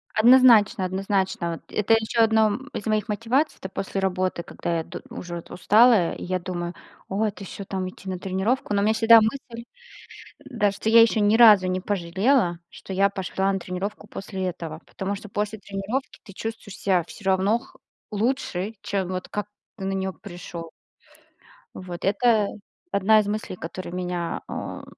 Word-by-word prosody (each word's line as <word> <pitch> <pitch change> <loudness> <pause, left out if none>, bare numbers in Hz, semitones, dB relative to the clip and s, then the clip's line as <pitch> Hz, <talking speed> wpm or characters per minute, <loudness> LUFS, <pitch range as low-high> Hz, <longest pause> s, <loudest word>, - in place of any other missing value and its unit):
Однозначно, 230 -4 +6
однозначно, 190 -2 -1
вот 165 - -8
это 210 +2 +3
ещё 225 +1 +1
одно, 220 -1 +4
м, 255 +7 -4
из - - -5
моих 215 -1 0
мотиваций, 235 +8 0
это - - -6
после 195 +1 -4
работы, 185 -2 -1
когда 170 0 -3
я 165 - -2
д - - -9
уже 175 -1 -7
устала, 210 +1 +4
и - - -8
я 185 +1 -1
думаю: 175 -1 -5 0.3
"О, 200 +3 0
это 205 -1 -4
ещё 195 +1 -8
там 190 -1 -3
идти 190 - -14
на 185 -1 -4
тренировку?" 200 +5 -1
Но 200 - +2
у - - +1
меня 220 - +3
всегда 225 +1 +7
мысль, 235 +1 -3 0.8
да 210 -5 0
что 200 +2 -3
я 230 +1 +8
ещё 225 -1 +4
ни 205 +2 +4
разу 215 -5 +8
не 185 0 0
пожалела, 190 +1 +1
что 190 - -9
я 195 +1 +3
пошла 190 0 -1
на 195 - 0
тренировку 190 +4 -5
после 190 -2 -5
этого. 165 -3 -6
Потому 195 +1 -4
что 210 +2 -10
после 210 +2 -3
тренировки 200 +6 -4
ты 195 - -13
чувствуешь 225 -1 -7
ся 185 -3 +1
всё 205 - -12
равно 190 +3 +3
х 260 +3 -17 0.3
лучше, 215 -2 -1
чем, 195 -2 -1
вот, 185 0 -4
как 210 0 -3 0.3
ты 195 - -5
на 195 - -1
неё 190 0 -2
пришел. 175 -4 -9 1.1
Вот, 180 -2 -7
это 210 +1 +3 0.4
одна 215 +3 +4
из 210 - 0
мыслей, 210 -2 -3
который 175 +1 -7
меня, 180 -1 -3
э, - - -6
200 Hz, 180 wpm, -24 LUFS, 185-220 Hz, 1.1 s, я